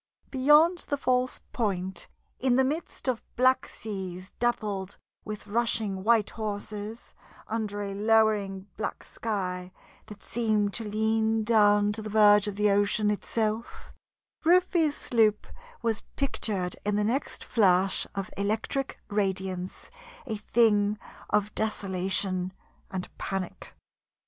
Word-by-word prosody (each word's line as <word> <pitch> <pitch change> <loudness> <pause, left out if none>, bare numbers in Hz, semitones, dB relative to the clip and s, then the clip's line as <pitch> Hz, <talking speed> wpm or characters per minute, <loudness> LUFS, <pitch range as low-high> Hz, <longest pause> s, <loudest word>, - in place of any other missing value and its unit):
Beyond 300 +6 +5
the 285 - +1
false 255 -2 +1
point, 190 -5 -2 0.3
in 255 -1 +3
the 265 - +4
midst 295 +2 -3
of 250 -3 0
black 255 +1 +3
seas 190 -3 -6
dappled 205 -5 -1 0.3
with 210 -1 -6
rushing 210 -3 0
white 225 -1 +3
horses, 210 +1 -5 0.3
under 210 -2 -2
a 200 -1 -4
lowering 210 -2 +2
black 220 - -4
sky 185 -4 -3 0.4
that 205 -1 -11
seemed 215 -4 0
to 230 - 0
lean 220 +1 +1
down 205 -2 +4
to 215 +1 -3
the 215 - -6
verge 210 -1 +6
of 205 - -3
the 210 0 +3
ocean 205 +1 +2
itself, 215 +2 -3 0.5
Rufe's 340 -3 +3
sloop 220 -3 +2 0.4
was 225 -2 0
pictured 205 -9 -1
in 210 0 0
the 210 - +2
next 245 +7 -1
flash 190 -3 +2
of 195 -1 -4
electric 220 +7 -2
radiance 190 -3 -3 0.3
a 225 -5 -3
thing 210 -1 +3 0.3
of 210 0 +1
desolation 190 -3 -1 0.4
and 185 -1 -4
panic. 190 -2 -5
210 Hz, 120 wpm, -28 LUFS, 200-230 Hz, 0.5 s, verge